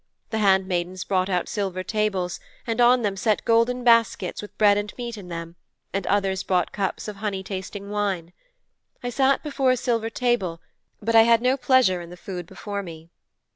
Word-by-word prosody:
The 220 - -1
handmaidens 185 -2 +1
brought 185 0 0
out 180 -2 0
silver 190 -3 -3
tables, 195 -4 -1 0.3
and 230 +1 0
on 245 0 +5
them 200 -2 0
set 210 +2 0
golden 235 +2 +2
baskets 230 -1 +3
with 210 - -11
bread 205 -1 +5
and 205 0 -2
meat 240 -2 -5
in 200 -4 -10
them, 170 0 -7 0.4
and 195 -1 -2
others 195 -1 +1
brought 180 -2 0
cups 200 +1 -3
of 210 -1 -6
honey 200 -2 -3
tasting 195 +1 -6
wine. 195 -5 -2 0.7
I 245 - -2
sat 270 +2 +2
before 275 -3 0
a 255 - +3
silver 230 -2 0
table 230 -9 0 0.4
but 230 +2 0
I 225 - +9
had 230 0 +5
no 255 +1 +3
pleasure 255 -9 +3
in 170 - -10
the 180 - -11
food 180 -1 -7
before 205 +1 -5
me.' 165 -2 -11
205 Hz, 185 wpm, -24 LUFS, 185-230 Hz, 0.7 s, I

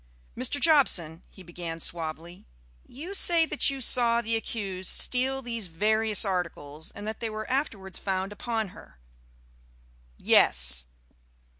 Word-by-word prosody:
"Mr. 285 - +1
Jobson," 195 - +3
he 190 - -15
began 170 -1 -7
suavely, 165 +1 -6 0.4
"you 325 +9 -8
say 340 -4 +4
that 305 -3 +2
you 275 -1 -4
saw 235 -2 +5
the 230 -1 -2
accused 195 -5 -4
steal 265 +1 0
these 230 -4 -3
various 215 +5 +2
articles, 165 -5 -4
and 205 - -8
that 220 +1 -5
they 230 - -4
were 215 0 -6
afterwards 215 -9 -3
found 190 0 -3
upon 220 0 -3
her?" - - -16 1.2
"Yes." 60 0 +3
210 Hz, 130 wpm, -27 LUFS, 175-240 Hz, 1.2 s, saw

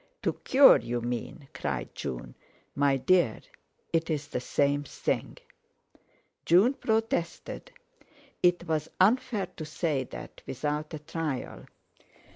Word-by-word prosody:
"To - - +1
cure, 270 +1 +7
you 120 +1 -3
mean!" 120 +4 -5
cried 70 -4 -3
June. 65 -4 -5 0.4
"My 140 -1 +3
dear, 135 -3 +2 0.5
it's 160 -3 0
the 125 - -3
same 140 +3 +1
thing." - - -3 1.1
June 190 - +5
protested. 225 - -2 0.7
It 175 -1 +3
was 155 -1 -1
unfair 215 +1 +3
to 160 - -5
say 155 -3 -1
that - - -10
without 150 +3 -2
a - - -4
trial. 150 -2 -4
155 Hz, 110 wpm, -28 LUFS, 135-180 Hz, 1.1 s, cure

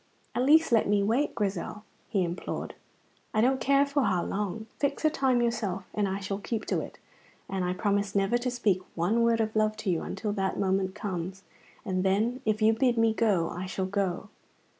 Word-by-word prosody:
"At - - 0
least 310 +4 +5
let 225 -2 +4
me 205 -1 +3
wait, 235 +8 +1
Grizel," 205 -1 -3 0.3
he 195 -5 +1
implored. 175 +1 -4 0.6
"I 215 - +4
don't 260 +3 +2
care 275 +1 +4
for 280 0 0
how 190 -7 +1
long; 210 +2 -3
fix 280 +2 -1
a 310 - +5
time 260 -4 +2
yourself, 205 -5 -1
and 205 -1 +1
I 190 +1 -2
shall 195 0 -3
keep 220 +1 -3
to - - +1
it, - - -9 0.5
and 190 -1 -2
I 180 0 0
promise 200 +1 0
never 200 +5 +2
to 250 +1 -1
speak 215 -7 +1
one 185 +8 +1
word 230 0 +3
of 220 -1 -1
love 215 0 +2
to 215 -3 -1
you 165 - 0
until 205 +1 -3
that 195 -2 -1
time 190 -1 +1
comes, 190 -2 -5 0.4
and 185 -2 -1
then 215 +7 +1
if 215 0 +1
you 220 +1 +6
bid 245 +1 +2
me 225 -1 +4
go 200 -7 +2
I 180 +2 -5
shall 190 0 -2
go. 195 0 -2
210 Hz, 205 wpm, -28 LUFS, 190-235 Hz, 0.6 s, you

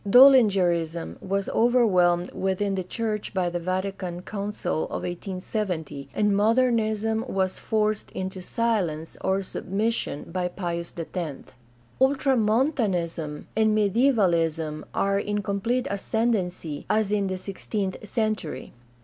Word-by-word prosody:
Doellingerism 195 - +5
was 195 +1 -1
overwhelmed 185 -7 +3
within 195 +1 0
the 190 - -1
church 210 +2 -3
by 180 -2 +1
the 175 - -2
Vatican 185 0 -3
Council 205 -5 -2
of - - -5
1870, 180 -5 -4
and 210 -1 +2
Modernism 220 0 +2
was 190 -4 -1
forced 215 -1 0
into 185 0 -5
silence 180 -8 -1
or 190 +1 +1
submission 200 -4 -2
by 180 +1 -2
Pius 170 -2 -4
X. 165 -3 -5 0.5
Ultramontanism 220 - +1
and 220 -1 +3
Mediaevalism 175 - +2
are 195 0 +1
in 205 0 -2
complete 230 +6 0
ascendency, 195 -7 -1
as 215 -2 +2
in 205 -2 +1
the 185 0 -2
sixteenth 195 0 -3
century. 215 - -2
195 Hz, 110 wpm, -26 LUFS, 175-220 Hz, 0.5 s, Doellingerism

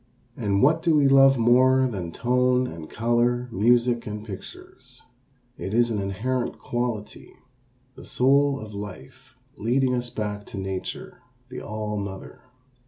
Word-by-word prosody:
And 100 +1 0
what 160 +4 +4
do 165 -2 +2
we 145 -2 +4
love 135 0 +6
more 130 +3 +4
than 95 -8 -5
tone 125 +4 +1
and 80 -8 -8
color, 120 +2 +1
music 120 +3 +2
and 105 0 -6
pictures? 100 -4 -11 0.6
It 95 - -4
is 120 0 +3
an 105 -2 -1
inherent 115 +6 -2
quality, 120 -3 -4 0.6
the - - -13
soul 140 +2 +2
of 110 -1 -9
life 100 -2 -10 0.2
leading 125 +4 +1
us 120 -1 -2
back 105 -2 -5
to - - -8
nature, 95 +4 -6 0.3
the 125 - -7
All 105 -1 -4
mother. 100 -1 -7
120 Hz, 140 wpm, -24 LUFS, 105-125 Hz, 0.6 s, love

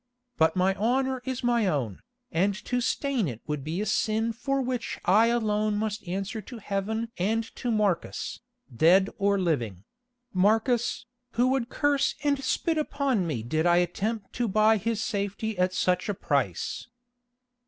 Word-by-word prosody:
But 160 0 +3
my 185 +1 +3
honour 255 +5 0
is 260 -1 -3
my 235 -3 +2
own, 130 - -1 0.3
and 195 +4 +2
to 245 0 0
stain 255 - 0
it 115 -5 -5
would 150 -2 -3
be 165 +6 -2
a - - -1
sin 220 +2 +1
for 275 +4 -1
which 255 -2 -3
I 210 +5 +5
alone 215 -3 +1
must 215 -2 -3
answer 195 +5 -3
to 240 +4 -10
Heaven 220 +2 -3
and 220 +5 +1
to 245 - -3
Marcus, 210 -6 -1 0.4
dead 185 - +5
or 200 0 +3
living—Marcus, 220 - -1 0.3
who 245 +2 +3
would 260 -2 0
curse 285 -1 +1
and 280 -2 +1
spit 320 +4 0
upon 275 - 0
me 125 -9 -2
did 155 +8 0
I 175 - +5
attempt 195 +5 -1
to 240 -1 0
buy 215 +2 +4
his 225 +2 -1
safety 205 +1 -2
at 180 0 +3
such 180 +1 0
a 205 - 0
price." 135 - -1
215 Hz, 155 wpm, -27 LUFS, 185-240 Hz, 0.4 s, I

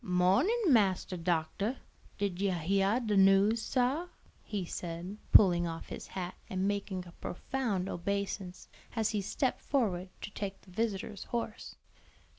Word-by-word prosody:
"Mornin', 190 - +3
Massa 190 -4 +3
Doctah; 175 +7 -1 0.4
did 200 -3 -2
you 200 - +2
heyah 195 +7 +2
de 210 -1 +1
news, 195 +3 +5
sah?" 265 +9 +1 0.4
he 200 -4 -3
said, 175 +4 -5
pulling 175 -4 +7
off 165 0 -6
his - - -7
hat 180 -1 -4 0.2
and 190 +1 0
making 200 -2 -2
a 175 - -11
profound 205 -2 -2
obeisance, 195 0 -3 0.3
as 220 -2 +1
he 210 -2 0
stepped 255 +6 -1
forward 195 -10 0
to - - -6
take 195 -1 -5
the 185 - -17
visitor's 205 -1 -2
horse. 230 -2 -4
195 Hz, 140 wpm, -32 LUFS, 180-220 Hz, 0.4 s, pulling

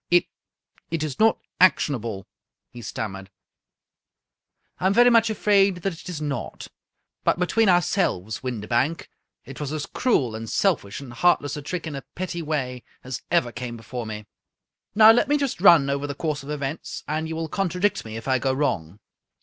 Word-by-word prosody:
" - - -61
It 175 0 +4 0.4
— - - -37
it's 155 -4 -3
not 220 0 +4 0.2
ac 185 - +8
tionable," 110 -8 -4 0.5
he 120 - -10
stammered. 95 -4 -6 0.8
" - - -50
I 185 - +2
am 195 - +2
very 245 +1 +6
much 230 -1 +5
afraid 200 -4 +2
that 195 - -1
it 165 - -10
is 170 -4 -5
not; 145 -5 -5 0.5
but - - +2
between 195 +4 +2
our 175 -1 +5
selves, 110 - -1
Windibank, 125 +5 -1 0.4
it 135 - -10
was 145 -2 -4
as 155 -1 -3
cruel, 135 - 0
and 110 0 -6
selfish, 150 - 0
and 130 -4 -9
heart 175 +8 +3
less 145 - -4
a 150 - -5
trick 170 +4 -4
in 155 -3 -5
a 135 - -5
petty 180 -1 -4
way 135 -6 -3 0.2
as 130 -1 -5
ever 170 -9 +2
came 120 -1 -6
before 115 +1 -6
me. 105 -1 -6 0.7
Now, 220 +1 +9
let 240 +4 +3
me 295 +1 +3
just 275 -10 -2
run 170 -8 +7
over 140 +1 -1
the 145 - -5
course 150 -2 -2
of 140 - -11
events, 145 +1 -4
and 155 +2 -2
you 160 - -4
will 165 0 -3
contradict 190 +3 0
me 110 0 -7
if 115 - -8
I 130 -1 +2
go 135 0 0
wrong." 100 - -2
150 Hz, 195 wpm, -24 LUFS, 125-180 Hz, 0.8 s, Now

